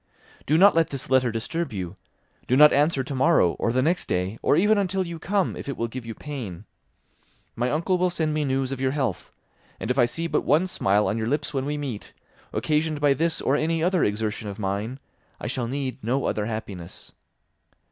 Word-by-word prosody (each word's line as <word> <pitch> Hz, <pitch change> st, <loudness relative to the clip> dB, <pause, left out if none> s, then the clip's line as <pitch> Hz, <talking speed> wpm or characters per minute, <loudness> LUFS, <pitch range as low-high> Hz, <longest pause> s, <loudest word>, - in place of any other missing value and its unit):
"Do 155 Hz, -, +4 dB
not 200 Hz, +4 st, +7 dB
let 165 Hz, 0 st, +3 dB
this 135 Hz, -1 st, -5 dB
letter 130 Hz, -2 st, +4 dB
disturb 140 Hz, +8 st, -3 dB
you; 95 Hz, -3 st, -5 dB, 0.5 s
do 130 Hz, -, +3 dB
not 150 Hz, +1 st, +8 dB
answer 145 Hz, -1 st, +2 dB
tomorrow, 135 Hz, -, +3 dB
or 115 Hz, -, +1 dB
the 130 Hz, +2 st, +1 dB
next 175 Hz, +5 st, 0 dB
day, 90 Hz, +5 st, -2 dB
or -, -, +3 dB
even 205 Hz, +5 st, +4 dB
until 190 Hz, -1 st, 0 dB
you 170 Hz, -1 st, -6 dB
come, 195 Hz, +2 st, 0 dB
if -, -, -7 dB
it 140 Hz, -, -4 dB
will 115 Hz, -, -1 dB
give 115 Hz, 0 st, -7 dB
you 115 Hz, -, -5 dB
pain. 110 Hz, -, -7 dB, 0.9 s
My 120 Hz, +2 st, 0 dB
uncle 170 Hz, +6 st, 0 dB
will 180 Hz, 0 st, +3 dB
send 160 Hz, -3 st, -1 dB
me 155 Hz, 0 st, 0 dB
news 135 Hz, -1 st, 0 dB
of 135 Hz, -1 st, -4 dB
your 130 Hz, 0 st, +1 dB
health, 130 Hz, -9 st, -2 dB, 0.5 s
and -, -, -2 dB
if 130 Hz, -, 0 dB
I 120 Hz, -, +6 dB
see 120 Hz, +8 st, -3 dB
but 165 Hz, -, +1 dB
one 155 Hz, +6 st, +3 dB
smile 105 Hz, -, +1 dB
on 115 Hz, -, -1 dB
your 110 Hz, -, -2 dB
lips 145 Hz, +3 st, -1 dB
when 135 Hz, -1 st, -1 dB
we 150 Hz, 0 st, -2 dB
meet, 135 Hz, -8 st, -6 dB, 0.4 s
occasioned 155 Hz, 0 st, 0 dB
by 145 Hz, -1 st, +4 dB
this 165 Hz, +3 st, 0 dB
or 135 Hz, -, +2 dB
any 160 Hz, +2 st, 0 dB
other 180 Hz, -1 st, +2 dB
exertion 105 Hz, 0 st, -1 dB
of 100 Hz, -, -7 dB
mine, 105 Hz, +5 st, -3 dB, 0.4 s
I -, -, -7 dB
shall 120 Hz, -2 st, -2 dB
need 135 Hz, 0 st, -4 dB
no 130 Hz, +5 st, 0 dB
other 105 Hz, -1 st, -1 dB
happiness. 100 Hz, -6 st, -7 dB
135 Hz, 210 wpm, -25 LUFS, 115-160 Hz, 0.9 s, not